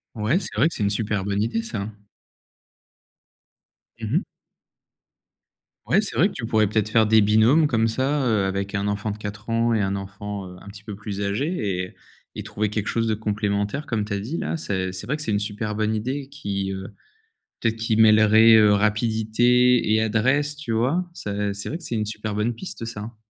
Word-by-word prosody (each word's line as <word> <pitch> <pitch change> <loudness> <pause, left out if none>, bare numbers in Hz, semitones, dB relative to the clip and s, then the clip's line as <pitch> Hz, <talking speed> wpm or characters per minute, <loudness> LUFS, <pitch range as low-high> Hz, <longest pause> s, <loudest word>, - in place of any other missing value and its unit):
Ouais, 110 - +1
c'est - - -7
vrai 155 - +3
que - - -10
c'est - - -5
une 100 - +2
super 105 -1 -1
bonne 100 0 0
idée 115 0 -1
ça. 110 -3 -4 2.1
Mmh - - -4
mh. - - +2 1.6
Ouais, 195 - +4
c'est 210 - -5
vrai 190 +6 +4
que - - -11
tu 115 -5 -5
pourrais, 110 -2 +3
peut-être, 110 +1 0
faire 110 -1 +4
des 110 0 +5
binômes 110 +9 +4
comme 115 -4 +2
ça, 135 +4 0
heu, 110 -5 +2
avec 100 +1 -2
un 100 0 -1
enfant 105 +1 -2
de 105 - -6
4 105 +2 -7
ans 115 +1 +2
et 110 - +1
un 95 0 -1
enfant, 100 0 -6
heu, 90 - -11
un - - -15
petit 100 +1 -11
peu 105 -2 -7
plus 100 0 -6
âgé 130 - -1 0.3
et 90 - -9 0.4
et - - -4
trouver 105 0 -2
quelque 105 0 -3
chose 115 -1 0
de 110 - +1
complémentaire 105 +4 -2
comme 115 -7 -1
tu 105 - -8
as 100 - 0
dit, 130 +12 -4
là. - - -2
C'est 95 -10 -2
c'est 90 0 -6
vrai 150 - -1
que 150 - -7
c'est 155 - -4
une 100 - +1
super 105 +1 -3
bonne 110 +1 0
idée 130 +5 -3
qui, 100 -9 -4
heu, 95 0 -6 0.7
peut-être 115 -1 0
qui 110 -1 -1
mêlerait 110 +1 +7
rapidité 110 +3 +3
et 110 0 +4
adresse, 130 +7 +1
tu 145 -6 -6
vois? 130 +11 +1
Ça 105 - -3
c'est 100 0 -6
vrai 160 - -3
que 175 - -15
c'est 120 - -4
une 105 -1 0
super 105 0 -4
bonne 105 +3 0
piste, 115 -6 -7
ça, 115 -2 -6
hein. 110 +2 -8
110 Hz, 210 wpm, -23 LUFS, 105-120 Hz, 2.1 s, mêlerait